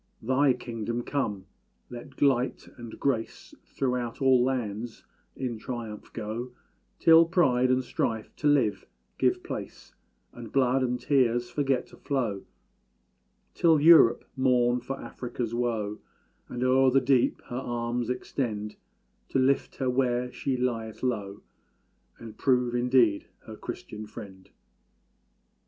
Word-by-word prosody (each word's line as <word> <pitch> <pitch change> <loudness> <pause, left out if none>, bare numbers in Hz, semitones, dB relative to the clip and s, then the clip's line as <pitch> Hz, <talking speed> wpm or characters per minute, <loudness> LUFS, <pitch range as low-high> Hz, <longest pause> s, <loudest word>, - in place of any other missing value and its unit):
Thy 130 +3 +3
kingdom 120 -1 -4
come! 105 -10 -2 0.5
Let 130 +4 -6
Light 130 -2 +1
and 120 -2 -10
Grace 130 -5 -2
Throughout 125 -3 -2
all 130 -2 +4
lands 120 -3 -3 0.3
in 120 -4 -4
triumph 115 -2 -7
go; 115 +4 -5 0.4
Till 165 0 +7
pride 130 -8 +2
and 130 0 +2
strife 110 -2 -3
to 150 - 0
love 140 -8 +2 0.3
give - - +1
place, - - -7 0.4
And 120 -2 -10
blood 130 -1 +2
and 125 -1 -1
tears 120 -2 +1
forget 135 -2 0
to - - -16
flow; 120 -9 -2 1.1
Till 165 -3 +4
Europe 155 -6 +6
mourn 125 -2 +2
for 135 +2 -5
Afric's 120 -2 -5
woe, 115 -4 -2 0.5
And 125 0 -3
o'er 130 +1 +4
the 135 +1 +4
deep 130 -1 +2
her 120 - -4
arms 120 0 -2
extend 110 -4 -3 0.5
To - - 0
lift 135 +1 +1
her 130 - -2
where 125 -1 0
she 130 0 -2
lieth 115 -3 -3
low, 105 -5 -3 0.7
And 115 -2 -10
prove 125 -2 +2
indeed 120 -4 +2 0.2
her - - -9
Christian 105 0 -8
Friend! 95 -3 -11
125 Hz, 125 wpm, -27 LUFS, 115-130 Hz, 1.1 s, Till